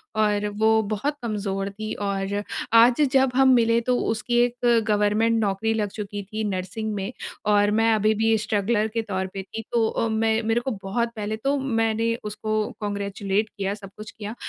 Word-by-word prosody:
और 210 -1 +1
वो 220 0 +4
बहुत 285 +8 -2
कमज़ोर 200 -3 -2
थी। 215 +2 -5
और 200 0 -2 0.3
आज 235 +4 +6
जब 265 -1 +4
हम 265 0 +5
मिले 230 -1 +4
तो 250 - +3
उसकी 225 +2 -1
एक 245 -1 +2
गवर्नमेंट 215 +2 +2
नौकरी 215 +1 0
लग 210 -2 -1
चुकी 205 0 -5
थी 215 +3 -5
नर्सिंग 195 +3 -3
में 200 +2 -3 0.4
और 205 0 +4
मैं 225 +1 +3
अभी 215 0 +3
भी 225 +1 +2
स्ट्रगलर 210 +1 0
के 225 +1 -2
तौर 190 -4 -3
पे 195 - -5
थी। 220 +3 -7
तो 230 -2 +2
अ, 230 - -1
मैं 220 0 +1
मेरे 225 +2 +1
को 265 - -3
बहुत 235 +5 -1
पहले 215 0 -3
तो 275 +5 0
मैंने 225 -3 0
उसको 215 +1 -3 0.2
कांग्रेचुलेट 200 0 -2
किया, 195 0 -1
सब 200 -2 -10
कुछ 215 - -8
किया, 215 +1 -7
215 Hz, 180 wpm, -24 LUFS, 205-225 Hz, 0.4 s, आज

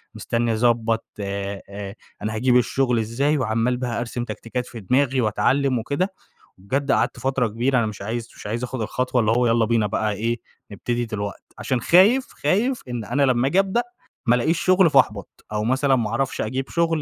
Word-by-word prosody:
مستني 115 0 -1
أضبط 115 0 +1
أ 100 0 -5 0.3
أنا 110 +1 -3
هاجيب 125 +2 +3
الشغل 125 0 +1
إزاي؟ 135 +7 0
وعمّال 115 0 0
بقى 125 -2 -2
أرسم 120 0 -3
تكتيكات 120 +2 -5
في 120 - -9
دماغي 130 +5 +1
وأتعلّم 130 +4 +1
وكده. 160 - -2 0.4
وبجد 135 +9 -1
قعدت - - +1
فترة 130 -2 0
كبيرة 120 +5 0
أنا 115 - +2
مش 105 -2 -6
عايز 115 +3 -4
مش - - -9
عايز 115 +4 -3
آخُد 125 -1 -4
الخطوة 125 +3 0
اللي 110 0 +2
هو 120 +1 +3
يالّا 115 0 +3
بينا 110 -1 +2
بقى 105 +1 -1
إيه، 115 +3 -2 0.3
نبتدي 120 +3 -2
دلوقتي، 100 -3 -5 0.2
عشان 130 -3 -1
خايف 210 - +5 0.2
خايف 225 - +1
إن 120 -3 -4
أنا 140 +5 +1
لمّا 130 -1 +3
آجي 180 +7 +3
أبدأ 195 +5 +1 0.4
ما 120 - +4
لقيش 155 +8 +1
شغل 185 -1 +5
فأحبط، 110 - +1
أو 105 0 -1
مثلًا 130 +4 +2
ما 115 -4 -1
أعرفش 130 +4 -1
أجيب 130 +5 -3
شغل 165 -2 +1
120 Hz, 185 wpm, -23 LUFS, 110-135 Hz, 0.4 s, خايف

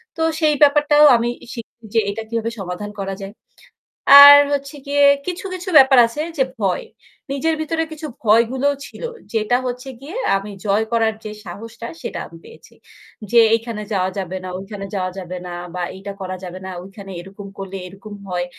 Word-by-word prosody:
তো 325 - -5 0.2
সেই 305 -2 +3
ব্যাপারটাও 295 +1 +5
আমি 235 +1 -1 0.2
শিখছি 235 -1 -11
যে 230 - +4
এটা 205 +2 -4
কিভাবে 230 0 -2
সমাধান 190 +2 -5
করা 195 0 -4
যায়। 195 +1 -8 0.9
আর 285 0 +11 0.2
হচ্ছে 280 +1 -3
গিয়ে 285 0 +2 0.2
কিছু, 365 +2 -4
কিছু 370 +1 -6
ব্যাপার 265 -1 +7
আছে 230 +6 -5 0.2
যে 265 - +4 0.2
ভয়। 190 -4 0 0.5
নিজের 280 +4 0
ভেতরে 325 +1 -1
কিছু 310 0 -7 0.2
ভয়গুলোও 240 +6 +3
ছিল - - -12 0.3
যেটা 225 +2 +1
হচ্ছে 250 +2 -5
গিয়ে 315 - -8 0.2
আমি 200 +2 -7
জয় 210 +2 +1
করার 225 -1 +2
যে 215 - -6
সাহসটা 230 +5 -9
সেটা - - -5
আমি 165 - -14
পেয়েছি। - - -16 0.6
যে 240 - +6 0.2
এইখানে 230 -1 -5
যাওয়া 185 -1 +1
যাবে 190 -1 -4
না, 185 - -6
ওইখানে 195 +1 -7
যাওয়া 185 -1 -2
যাবে 180 0 -7
না 175 - -6 0.2
বা 180 - -2
এইটা 195 +1 -7
করা 185 0 -4
যাবে 180 0 -7
না, 190 - -6
ওইখানে 195 +1 -11
এরকম 195 +2 -11
করলে 195 0 -6
এরকম 195 +3 -12 0.2
হয়। 175 -1 -2
225 Hz, 180 wpm, -20 LUFS, 195-275 Hz, 0.9 s, আর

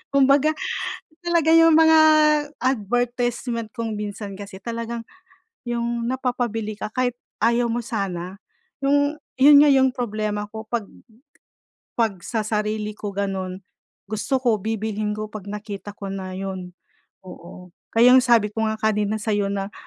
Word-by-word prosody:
Kumbaga, 280 +3 +4 0.7
talaga 340 -2 +2
yung 330 0 +7
mga 320 0 +6 0.6
advertisement 240 -1 -1
kung 225 -2 -4
minsan 205 -1 -6
kasi 195 -1 -9
talagang, 230 +1 -4 0.6
yung 235 -1 -2
napapabili 245 -4 -2
ka 210 - -6
kahit 250 0 -1 0.2
ayaw 235 +1 +2
mo 240 - -1
sana. 195 -3 -4 0.4
'Yung 285 +1 +2 0.3
yun 285 +2 +8
nga 295 - +6
yung 265 -2 +4
problema 215 -4 -3
ko 220 +1 -8
'pag 225 -2 -3 1.0
'pag 220 -5 0
sa 225 -2 -2
sarili 210 0 -2
ko 205 -1 -5
ganun, 190 -1 -3 0.5
gusto 235 +5 -1
ko 235 -4 +2
bibilhin 215 0 -2
ko 215 0 -5
'pag 210 -2 -9
nakita 205 0 -7
ko 200 -1 -8
na 190 -1 -5
yun, 190 -1 -6 0.5
oo. 180 0 -12 0.2
Kaya 240 +2 +6
ang 260 - +8
sabi 230 -4 +3
ko 220 - -3
nga 220 - -2
kanina 215 -1 0
sa'yo 205 -2 -1
na 200 +1 -3
220 Hz, 140 wpm, -23 LUFS, 205-245 Hz, 1.0 s, yun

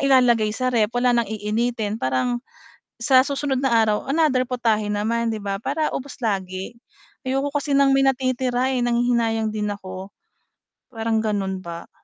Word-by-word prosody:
ilalagay 250 -5 +4
sa 255 -1 0
ref, 220 -3 +3
wala 245 0 +3
nang 235 -3 +1
iinitin, 220 0 -2
parang, 130 - 0 0.6
sa 260 +1 +5
susunod 280 -1 -1
na 265 -2 +1
araw, 215 -1 +1
another 275 -3 +2
putahe 230 -4 0
naman 230 +2 0
di 215 - -5
ba 200 -1 -2
para 295 +8 -1
ubos 270 -1 -6
lagi. 190 0 -3 0.5
Ayoko 270 +2 0
kasi 285 0 -2
ng 275 0 +5
may 270 - +3
natitira 255 -1 +1
eh, 250 -2 0
nanghihinayang 235 -2 +1
din 210 -1 -2
ako. 190 0 -9 0.7
Parang 225 -2 -1
ganun 200 -3 -1
ba. 170 -2 -10
235 Hz, 155 wpm, -22 LUFS, 210-260 Hz, 0.7 s, sa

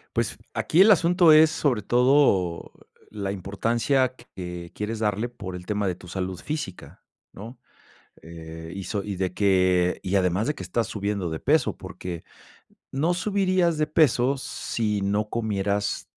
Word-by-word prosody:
Pues, - - -1 0.2
aquí 170 - +2
el 205 - +7
asunto 175 -2 +5
es, 155 0 +7
sobre 125 -8 0
todo, 120 -8 +2 0.4
la 100 -2 -3
importancia 115 +7 0
que 90 -8 -9
quieres 110 +1 -4
darle 105 +2 -1
por 95 -6 -8
el 90 0 -9
tema 105 -1 -1
de 90 - -1
tu 90 - -14
salud 95 0 -4
física, 150 - -6 0.3
¿no?, 115 +6 -10 0.6
eh, 80 0 -9
y 95 -1 -6
so 100 -2 -3
y 100 -2 -5
de 95 -1 -2
que, 90 -3 +2
y 95 - -2
además 95 +3 +1
de 150 - -1
que - - -7
estás 115 - -1
subiendo 100 -3 -3
de 80 0 -4
peso, 150 0 +2
porque 85 -2 -7 0.7
no 155 +6 0
subirías 185 -3 +1
de 155 - +2
peso 140 -4 +3
si 110 -5 -3
no 100 +2 0
comieras 105 -2 -1
105 Hz, 155 wpm, -25 LUFS, 95-135 Hz, 0.7 s, el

